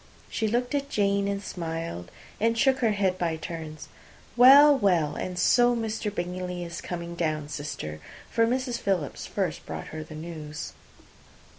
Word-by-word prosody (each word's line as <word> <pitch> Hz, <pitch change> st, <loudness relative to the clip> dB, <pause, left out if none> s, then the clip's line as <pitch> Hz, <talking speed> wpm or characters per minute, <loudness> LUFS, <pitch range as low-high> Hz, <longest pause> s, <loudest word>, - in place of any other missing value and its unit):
She 220 Hz, -, 0 dB
looked 245 Hz, +4 st, 0 dB
at 280 Hz, -1 st, -1 dB
Jane, 200 Hz, -3 st, +1 dB
and 200 Hz, 0 st, -2 dB
smiled, 165 Hz, -, -5 dB, 0.3 s
and 230 Hz, +1 st, +2 dB
shook 265 Hz, +2 st, +3 dB
her 225 Hz, -4 st, +2 dB
head, 190 Hz, -2 st, 0 dB
by 165 Hz, -2 st, 0 dB
turns. 160 Hz, -1 st, -7 dB, 0.5 s
"Well, 280 Hz, +4 st, +9 dB
well, 180 Hz, -, +2 dB
and 180 Hz, -1 st, -4 dB
so 245 Hz, +6 st, +4 dB
Mr. 220 Hz, -2 st, -2 dB
Bingley 180 Hz, -1 st, -4 dB
is 170 Hz, 0 st, -6 dB
coming 170 Hz, -1 st, -5 dB
down, 155 Hz, -3 st, -1 dB
sister," 140 Hz, -, -5 dB, 0.3 s
(for 230 Hz, 0 st, +2 dB
Mrs. 250 Hz, 0 st, -1 dB
Philips 180 Hz, -8 st, -2 dB
first -, -, -2 dB
brought -, -, -6 dB
her 155 Hz, 0 st, -6 dB
the 155 Hz, 0 st, -11 dB
news). 155 Hz, -2 st, -7 dB
180 Hz, 155 wpm, -27 LUFS, 160-230 Hz, 0.5 s, Well